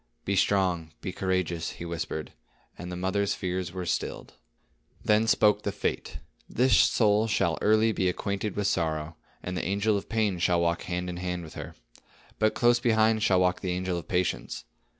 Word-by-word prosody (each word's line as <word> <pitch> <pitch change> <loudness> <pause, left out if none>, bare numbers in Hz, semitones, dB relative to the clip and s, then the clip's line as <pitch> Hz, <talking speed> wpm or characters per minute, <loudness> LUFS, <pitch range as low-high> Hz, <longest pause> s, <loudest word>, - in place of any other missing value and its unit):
"Be 100 - 0
strong, 90 -5 +1
be 95 - -4
courageous," 90 -3 -1
he 85 - -8
whispered; 85 -2 -4 0.4
and 90 0 -7
the - - -4
mother's 95 +3 0
fears 90 -1 -3
were 90 0 -5
stilled. - - -3 0.7
Then 110 +1 +3
spoke 105 -1 +4
the 100 - -2
Fate: 100 - -3 0.3
"This 125 -2 +3
soul 105 0 +4
shall 85 -6 +1
early 110 +1 +4
be 95 -3 +1
acquainted 100 +2 -3
with 105 - -1
sorrow; 80 -5 -1 0.3
and 90 - -4
the - - -2
angel 100 +2 +1
of 100 - -7
pain 110 -5 0
shall 90 0 +2
walk 85 0 0
hand 90 0 -3
in 90 -1 -5
hand 90 -1 -3
with 80 - -10
her. - - -8 0.6
But 110 0 +2
close 120 0 +4
beside 110 -2 +3
shall 95 -3 +3
walk 90 0 +1
the 90 -2 -1
angel 90 0 -2
of - - -12
patience. 90 -7 -1
95 Hz, 180 wpm, -27 LUFS, 90-105 Hz, 0.7 s, spoke